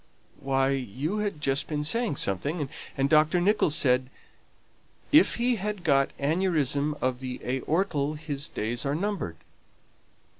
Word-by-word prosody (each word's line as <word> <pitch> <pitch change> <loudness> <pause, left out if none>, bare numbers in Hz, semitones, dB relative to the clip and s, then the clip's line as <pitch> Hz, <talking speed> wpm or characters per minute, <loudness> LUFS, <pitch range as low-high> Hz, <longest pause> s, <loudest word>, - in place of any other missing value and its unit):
"Why, 135 0 +1
you 135 - -2
had 205 -7 -2
just 135 -1 0
been 150 -1 -2
saying 230 +3 0
something, 140 - -1 0.3
and 135 0 +2
Dr. 155 +3 +4
Nicholls 180 -4 +3
said, 130 -2 +2 1.0
'If 310 +2 +6
he 240 0 +1
has 210 +1 -2
got 140 -4 +3
aneurism 150 -2 +1
of 130 -1 0
the 130 -1 -5
aorta 150 +2 0
his 150 -2 -4
days 115 +3 -3
are 140 +1 -1
numbered.'" 175 - -3
145 Hz, 135 wpm, -27 LUFS, 135-175 Hz, 1.0 s, If